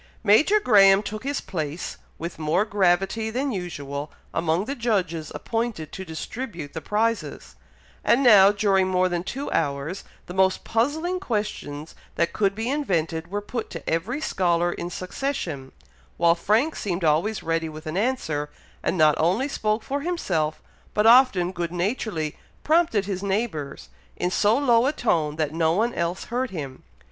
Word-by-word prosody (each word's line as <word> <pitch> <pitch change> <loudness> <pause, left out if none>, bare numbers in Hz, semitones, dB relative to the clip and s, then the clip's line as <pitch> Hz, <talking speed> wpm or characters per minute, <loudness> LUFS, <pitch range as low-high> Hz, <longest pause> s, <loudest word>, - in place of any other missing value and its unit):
Major 290 - +5
Graham 200 - +6
took 215 +1 -6
his 280 +1 -2
place, 160 -3 -4 0.2
with 170 0 -6
more 160 +6 +1
gravity 195 +2 +1
than 265 +5 -1
usual, 150 - -5 0.2
among 165 +3 0
the 275 - -3
judges 185 - -1
appointed 225 -9 -3
to 190 - -6
distribute 170 - -6
the 160 - -5
prizes; 225 +4 -2 0.5
and 255 +4 +3
now, 205 -5 +8
during 195 -2 +2
more 185 0 +2
than 175 -1 -2
two 270 +9 -5
hours, 140 +6 -1 0.2
the 180 - -8
most 190 0 +2
puzzling 315 +11 0
questions 205 - -4 0.2
that 170 - 0
could 200 -2 +1
be 225 +2 -3
invented 170 - -1
were 205 +2 -2
put 230 +2 -4
to - - -8
every 185 - -1
scholar 175 - +1
in 175 - -5
succession, 180 - -4 0.5
while 170 0 +5
Frank 215 - +1
seemed 180 -3 -3
always 165 +8 +1
ready 165 0 -1
with 155 +1 -10
an 155 +1 -4
answer, 190 - -1 0.3
and 185 - -1
not 155 -2 +6
only 190 - +2
spoke 215 -5 -1
for 280 +4 -3
himself, 165 - -1 0.3
but 210 - +2
often 225 -7 +6
good 170 -2 -3
naturedly 175 - -2 0.3
prompted 310 - +2
his 190 -2 -3
neighbours, 195 - -3 0.3
in 180 - -1
so 210 +4 +3
low 245 -3 +4
a 290 - +1
tone 155 - 0
that 155 -1 -1
no 160 0 +2
one 230 +6 +1
else 170 +1 -2
heard 250 +2 -2
him. 140 -8 -6
190 Hz, 160 wpm, -24 LUFS, 165-230 Hz, 0.5 s, now